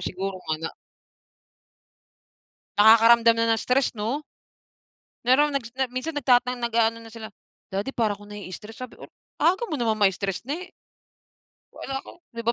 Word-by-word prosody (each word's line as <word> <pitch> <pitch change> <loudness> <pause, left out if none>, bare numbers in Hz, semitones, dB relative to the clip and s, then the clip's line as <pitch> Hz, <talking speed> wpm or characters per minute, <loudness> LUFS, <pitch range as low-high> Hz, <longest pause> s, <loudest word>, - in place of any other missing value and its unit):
siguro 190 0 -4
nga 155 - +1
na - - -2 2.1
Nakakaramdam 230 +2 +7
na 230 - +2
ng - - -4
stress 255 0 +1
no? 230 +8 -2 1.0
Meron 285 +4 +4
nagsna 255 0 -2
minsan 255 +6 -4
nag 290 - -3 0.2
nag-aano 235 -2 0
na 225 - -11
sila, 225 -1 -8 0.5
"Daddy 200 +7 -2
para 220 -3 +1
ko 205 - -15
naii-stress" 210 +1 -9
sabi 255 0 -8
ko, - - -14 0.4
"Aga 375 +7 +3
mo 310 - -3
naman 225 -2 +1
mai-stress 195 0 0
ne." 345 +7 -5 1.0
Wala 270 0 -5
ko - - -14
di 230 - -5
ba 235 - +2
230 Hz, 145 wpm, -25 LUFS, 210-260 Hz, 2.1 s, Nakakaramdam